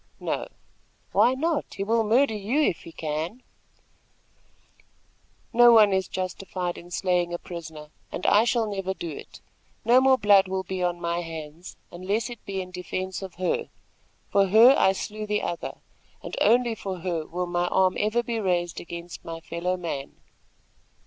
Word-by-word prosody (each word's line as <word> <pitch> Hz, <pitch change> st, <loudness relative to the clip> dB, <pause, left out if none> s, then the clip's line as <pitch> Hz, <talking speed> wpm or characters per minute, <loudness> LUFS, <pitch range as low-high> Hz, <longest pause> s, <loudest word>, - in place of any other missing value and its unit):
"No." -, -, -3 dB, 0.6 s
"Why 230 Hz, +6 st, +4 dB
not? 310 Hz, +1 st, -1 dB
He 195 Hz, -, -2 dB
will 225 Hz, +2 st, +2 dB
murder 230 Hz, +3 st, +3 dB
you 215 Hz, +7 st, -1 dB
if 240 Hz, -, +2 dB
he 165 Hz, -, -9 dB
can." 160 Hz, +10 st, -4 dB, 2.1 s
"No 240 Hz, +1 st, +8 dB
one 210 Hz, -3 st, +6 dB
is 190 Hz, -1 st, +1 dB
justified 185 Hz, -1 st, -4 dB
in 175 Hz, -, -11 dB
slaying 175 Hz, -1 st, 0 dB
a -, -, -2 dB
prisoner, 160 Hz, -4 st, -9 dB, 0.2 s
and 185 Hz, -, -5 dB
I 210 Hz, +2 st, +5 dB
shall 235 Hz, -1 st, +1 dB
never 195 Hz, -2 st, -3 dB
do 170 Hz, -3 st, -5 dB
it. -, -, -10 dB, 0.4 s
No 245 Hz, +2 st, +6 dB
more 265 Hz, 0 st, +5 dB
blood 200 Hz, -3 st, +5 dB
will 190 Hz, 0 st, -2 dB
be 190 Hz, 0 st, -4 dB
on 175 Hz, -1 st, 0 dB
my 170 Hz, 0 st, -1 dB
hands, 165 Hz, 0 st, -8 dB
unless 200 Hz, +6 st, -2 dB
it 240 Hz, -, -10 dB
be 195 Hz, -1 st, -2 dB
in 185 Hz, -, -13 dB
defence 185 Hz, +1 st, -4 dB
of 190 Hz, -2 st, -8 dB
her. 185 Hz, 0 st, -1 dB, 0.6 s
For 200 Hz, -1 st, +4 dB
her, 225 Hz, +7 st, +8 dB
I 190 Hz, -, +4 dB
slew 215 Hz, +2 st, -5 dB
the 210 Hz, 0 st, 0 dB
other, 170 Hz, -, -4 dB, 0.5 s
and -, -, -6 dB
only 235 Hz, +2 st, +4 dB
for 190 Hz, -4 st, -6 dB
her 170 Hz, -3 st, -2 dB
will 180 Hz, +1 st, -3 dB
my 175 Hz, 0 st, -1 dB
arm 185 Hz, 0 st, +2 dB
ever 215 Hz, +3 st, +1 dB
be 235 Hz, -1 st, -2 dB
raised 175 Hz, -4 st, -1 dB
against 170 Hz, 0 st, -8 dB
my 165 Hz, 0 st, -6 dB
fellow 170 Hz, +3 st, -3 dB
man." 160 Hz, -6 st, -5 dB
190 Hz, 170 wpm, -26 LUFS, 175-215 Hz, 2.1 s, No